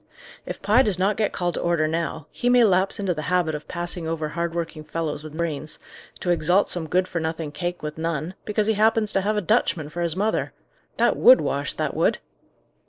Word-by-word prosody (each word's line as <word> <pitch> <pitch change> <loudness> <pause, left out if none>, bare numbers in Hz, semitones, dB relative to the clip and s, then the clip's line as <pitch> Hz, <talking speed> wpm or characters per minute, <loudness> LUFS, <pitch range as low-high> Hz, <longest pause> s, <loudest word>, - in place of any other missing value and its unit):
"If - - -6
Pye 220 +5 +5
does 210 -8 +3
not 195 +3 +1
get 215 -2 0
called 175 -1 -2
to - - -3
order 170 -2 +1
now, 160 -1 -3
he 245 - -1
may 245 -1 +6
lapse 190 0 +3
into 195 -3 0
the 155 - -5
habit 180 -3 +1
of 150 0 -6
passing 175 -1 -4
over 160 -1 -2
hard 170 +1 -3
working 165 -2 -4
fellows 155 -2 -3
with 155 0 -9
brains, 155 -3 -3 0.4
to 175 - 0
exalt 175 +4 +2
some 170 -3 -2
good 185 +3 +1
for 170 - -3
nothing 160 -1 -3
cake 175 +3 -4
with 150 +1 -5
none, 165 +1 -2
because 210 0 0
he 220 - +2
happens 215 0 +2
to 195 - +2
have 210 +2 0
a - - +1
Dutchman 180 -7 +1
for 175 +3 -5
his 170 -1 -1
mother. 210 +3 -1 0.4
That - - +3
would - - +8
wash, - - -1
that - - -2
would!" - - +2
175 Hz, 220 wpm, -24 LUFS, 160-200 Hz, 0.4 s, would